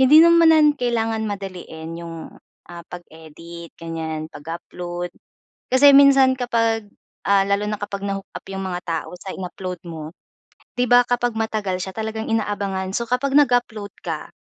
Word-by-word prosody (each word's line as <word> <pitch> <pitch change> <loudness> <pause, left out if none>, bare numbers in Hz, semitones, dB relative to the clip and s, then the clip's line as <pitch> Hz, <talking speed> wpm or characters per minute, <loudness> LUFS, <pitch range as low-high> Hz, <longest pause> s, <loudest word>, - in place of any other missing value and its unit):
Hindi 280 +4 +8
naman 320 -3 +6
kailangan 225 -2 -1
madaliin 180 -5 -6
'yong, 165 -1 -7 0.5
ah, 170 -1 -9
pag-edit 170 0 -11
ganyan, 160 -1 -4
pag-upload. 175 +3 -6 0.6
Kasi 280 +2 +7
minsan 275 -2 +6
kapag, 230 -3 0 0.4
ah, 200 -1 +5
lalo 200 +1 0
na 210 0 -2
kapag 205 -1 -5
na-hook-up 195 0 -5
'yong 195 0 -4
mga 180 -1 -3
tao 165 -2 -3
sa 190 - -6
in-upload 185 0 -6
mo, 160 -2 -7 0.7
'di 250 - +3
ba 245 0 +7
kapag 245 -1 0
matagal 215 -4 -1
siya 190 - -5
talagang 220 0 -3
inaabangan. 200 -4 -1
So, 235 - -1
kapag 260 +3 0
nag-upload 245 -7 +2
ka, - - -4
200 Hz, 140 wpm, -22 LUFS, 175-240 Hz, 0.7 s, Hindi